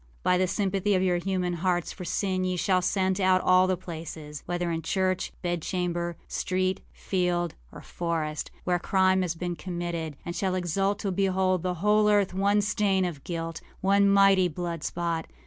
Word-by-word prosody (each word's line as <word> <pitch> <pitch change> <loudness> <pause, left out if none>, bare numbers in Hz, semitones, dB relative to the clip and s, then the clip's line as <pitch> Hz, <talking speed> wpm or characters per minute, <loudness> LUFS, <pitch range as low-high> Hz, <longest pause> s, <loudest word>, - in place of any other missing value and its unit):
By 180 - +3
the 185 - +2
sympathy 195 +1 0
of 185 - +2
your 180 -1 +2
human 180 -1 -1
hearts 175 0 0
for 180 - -8
sin 185 +1 -1
ye 185 0 0
shall 185 +1 +2
scent 190 +1 +1
out 185 -1 +4
all 185 0 +4
the 185 -1 +1
placesâwhether 165 0 -5
in 165 - -2
church, 185 +3 0
bedchamber, 175 0 -2
street, 185 0 -1
field, 175 -3 -1 0.2
or - - -10
forestâwhere 170 +1 -3
crime 190 0 +3
has 175 -2 -1
been 175 +1 -3
committed, 170 -2 -4
and 170 - -4
shall 190 -2 0
exult 195 +3 0
to 200 - -1
behold 185 -1 +1
the 180 0 -1
whole 210 0 +4
earth 205 -3 +3
one 200 +2 +2
stain 200 -2 +1
of 160 -6 -5
guilt, 165 -1 -4 0.2
one 200 +1 +4
mighty 195 -2 +5
blood 170 -1 -4
spot. 170 -2 -2
185 Hz, 165 wpm, -27 LUFS, 175-190 Hz, 0.2 s, mighty